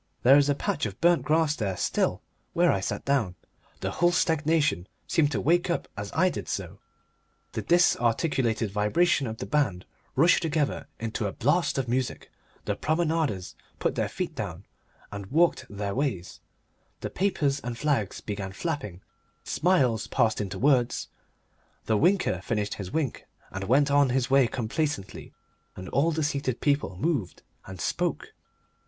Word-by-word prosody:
There 135 +4 +8
is 145 0 +2
a 145 - +3
patch 140 - -1
of 100 - -9
burnt 175 0 +4
grass 155 -1 +2
there 100 -8 -2
still - - 0 0.3
where 175 0 +4
I 95 - +1
sat 95 - -4
down. 130 -10 +1 0.5
The - - -2
whole 175 0 +3
stagnation 155 - +1 0.2
seemed 150 -3 +2
to - - 0
wake 175 +3 +2
up 170 - -1
as 105 0 -5
I 185 - +4
did 180 - -3
so, - - -5 0.7
the - - -3
disarticulated 120 - +2
vibration 135 - +2
of 110 0 -5
the - - -5
band 120 -12 0 0.3
rushed 165 +6 +5
together 155 -3 -1
into 110 -2 -2
a - - -3
blast 150 - +1
of 135 -2 -1
music, 125 +2 -2 0.3
the - - -1
promenaders 155 - -1 0.2
put - - 0
their - - -1
feet - - -4
down - - -6 0.5
and 100 -1 -6
walked 165 - +2
their 100 -1 -3
ways, 120 -10 -2 0.6
the - - -4
papers 150 -8 0
and 120 -2 -5
flags 135 -8 -1
began 100 -2 -5
flapping, 135 - -4 0.4
smiles 130 - +1
passed 110 -4 +1
into 95 -2 -4
words, 130 -3 +2 0.8
the 110 - +2
winker 170 - +2
finished 105 0 -2
his 100 -3 -6
wink 155 -6 -2 0.2
and 95 0 -4
went 140 +6 +3
on 145 -1 +4
his 130 0 0
way 135 -2 +5
complacently, 120 -2 -3 0.4
and 95 - -8
all 145 +4 +2
the 160 0 -1
seated 140 -4 -1
people 140 -10 0
moved 120 - -2 0.2
and 95 -1 -9
spoke. - - -2
135 Hz, 160 wpm, -27 LUFS, 105-155 Hz, 0.8 s, There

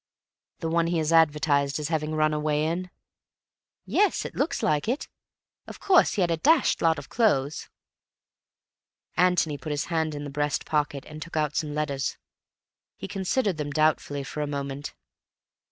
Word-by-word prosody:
"The 165 - -1
one 165 +1 +1
he 170 0 0
is 160 0 0
advertised 145 -3 +3
as 150 - -3
having 155 -1 -1
run 155 0 +2
away 150 0 0
in?" 175 +3 -2 1.0
"Yes. 415 -1 +2
It - - -6
looks 290 - -1
like 150 +4 +1
it. 255 +6 -1 0.6
Of - - -9
course 375 -3 +4
he 205 - +1
had 175 -2 +2
a 165 - +1
dashed 305 - +3
lot 165 -1 +3
of - - -8
clothes." 155 - +1 1.5
Antony 170 -5 +2
put 155 - -7
his 145 -1 -1
hand 160 -2 0
in 145 - -5
the 145 - -6
breast 145 0 -1
pocket 145 -2 -1
and 155 0 -9
took 170 0 -6
out 150 -1 0
some 150 -2 -2
letters. 140 -3 -2 0.8
He - - -6
considered 195 0 -1
them 150 -1 -3
doubtfully 145 -1 +1
for 150 +3 -5
a 150 - -1
moment. 140 0 -5
155 Hz, 170 wpm, -26 LUFS, 145-170 Hz, 1.5 s, course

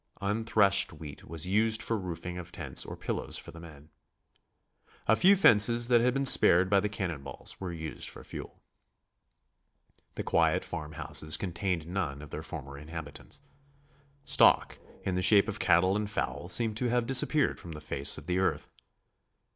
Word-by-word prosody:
Unthreshed 100 -1 +2
wheat 75 -2 -11
was 80 0 -6
used 110 +3 +1
for 115 - -1
roofing 90 -2 -6
of 85 0 -10
tents 75 -8 0
or - - -8
pillows - - -3
for - - -9
the 85 - -13
men. 75 -3 -14 1.1
A 110 - +4
few 195 - +5
fences 120 - +4
that 120 -2 +4
had 125 +2 +1
been 135 0 -1
spared 95 -7 +7
by 100 - +5
the 105 +2 -2
cannon 90 -8 -4
balls 70 - -7
were 95 -2 -4
used 80 -2 -5
for - - -12
fuel. - - -10 1.6
The - - -4
quiet - - +1
farmhouses 80 0 -2
contained 90 -2 -3
none 85 -6 -4
of 75 - -13
their 75 - -5
former 70 -3 -9
inhabitants. 75 - -8 0.8
Stock - - +3 0.2
in 95 - -2
the 90 - -1
shape 100 +2 +5
of - - -5
cattle 95 +3 +3
and 105 0 -2
fowl 75 -4 -4
seemed 110 +3 0
to 125 +1 -1
have 120 0 0
disappeared 135 +3 +2
from 85 - -9
the 75 - -8
face 70 -2 -1
of - - -11
the 90 +1 -1
earth. 95 - -1
90 Hz, 170 wpm, -29 LUFS, 80-110 Hz, 1.6 s, spared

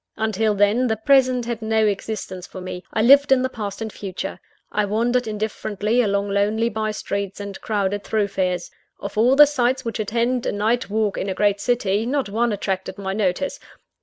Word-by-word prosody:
Until 220 -1 +1
then, 205 +5 +3
the 220 -1 0
present 255 +1 +3
had 235 -1 -4
no 220 0 +2
existence 195 -3 -3
for - - -9
me 180 0 -6
I 220 - +1
lived 280 +3 +6
in 260 -1 +5
the 260 - 0
past 210 -3 -5
and 220 - -6
future. 190 -3 -6 0.3
I 210 - +1
wandered 235 +4 0
indifferently 215 +1 -1
along 200 -2 0
lonely 210 +3 +1
bye 215 -1 -2
streets, 200 -2 -4
and 200 -1 -7
crowded 205 -1 -1
thoroughfares. 190 -4 -1 0.3
Of - - -6
all 240 +5 +4
the 295 +1 +9
sights 265 -2 0
which 230 0 -3
attend 235 +3 0
a - - +1
night 220 +3 0
walk 215 -1 0
in 195 - -2
a 190 - -2
great 205 -1 +1
city, 225 -3 0
not 270 -4 -1
one 230 +3 +1
attracted 190 -2 -3
my 190 -1 -3
notice. 205 +6 -1
215 Hz, 190 wpm, -22 LUFS, 200-235 Hz, 0.3 s, the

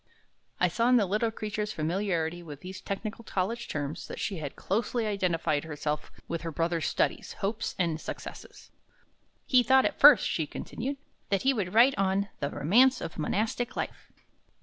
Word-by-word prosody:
I 180 - +4
saw 230 +8 +1
in 250 - +6
the 215 - +3
little 210 +4 +1
creature's 215 -1 -4
familiarity 170 0 -1
with 150 -4 -10
these 185 +1 -8
technical 215 +3 -5
college 225 +4 -2
terms 145 +3 -4
that - - -7
she 195 - -2
had 145 -3 -5
closely 230 +3 -1
identified 175 -7 0
herself 150 -1 -4 0.2
with 170 - -3
her 165 0 -4
brother's 165 +1 0
studies, - - -1
hopes, 210 +2 -3
and 165 -3 0
successes. - - -9 0.7
"He 255 -2 +5
thought 265 +2 +5
at - - -1
first," 290 +1 +8
she 160 -3 -1
continued, 270 - -5 0.3
"that 195 -1 +1
he 270 +1 +4
would 200 -5 -3
write 245 +4 +6
on 195 +1 +1
'The 140 - -1
Romance 250 - +4
of 160 - -6
Monastic 225 +8 -1
Life.'" - - -5
195 Hz, 170 wpm, -29 LUFS, 165-230 Hz, 0.7 s, first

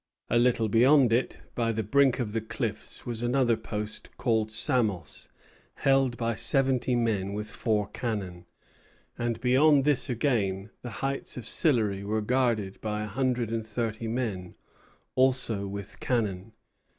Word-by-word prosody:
A 120 - +4
little 120 -2 +3
beyond 125 +3 +5
it, 120 +3 0 0.2
by 115 -1 0
the 110 0 -2
brink 135 +5 +3
of 110 -5 -3
the 115 - 0
cliffs, 110 -1 -4
was 120 -2 -4
another 120 -1 +2
post, 105 0 -6
called 110 -3 +1
Samos, 110 - -1 0.5
held 135 -3 +2
by 115 0 0
seventy 130 +1 +1
men 105 -5 0
with 105 +1 -5
four 110 -4 0
cannon; 95 -8 -4 0.7
and, 120 -1 -2
beyond 135 +3 +5
this 145 -3 +3
again, 110 -6 0
the 120 - -6 0.2
heights 135 -1 -3
of 120 - -6
Sillery 110 -10 +1
were 110 +2 -1
guarded 115 -4 0
by 105 -1 -2
a - - -4
hundred 120 +1 -1
and 115 -1 -1
thirty 110 +1 -3
men, 110 -7 -3 0.6
also 125 -6 +1
with 100 0 -7
cannon. 110 -4 -2
115 Hz, 145 wpm, -28 LUFS, 105-125 Hz, 0.7 s, beyond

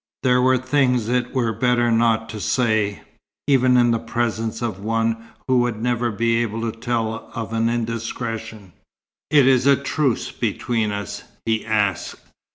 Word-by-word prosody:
There 125 -1 +3
were 130 0 +4
things 130 -3 +1
it 125 0 0
were 120 -4 0
better 120 +1 +2
not 115 -1 +2
to 110 - -6
say, 110 -3 0 0.4
even 130 -2 +4
in 120 -1 +4
the 115 - +1
presence 115 -1 -2
of 110 -5 -3
one 115 +2 0 0.3
who 130 -1 +3
would 120 -3 0
never 120 0 0
be 115 +2 +1
able 115 -1 -3
to 115 -1 -3
tell 115 -2 -2
of 115 -1 -5
an 115 0 +1
indiscretion. 115 -3 -4 0.6
"It 145 -3 +5
is 130 0 +4
a 140 - +7
truce 140 -2 -1
between 115 -3 -1
us?" 100 0 -5 0.2
he 110 -1 0
asked. 105 -5 -1
115 Hz, 160 wpm, -21 LUFS, 110-125 Hz, 0.6 s, a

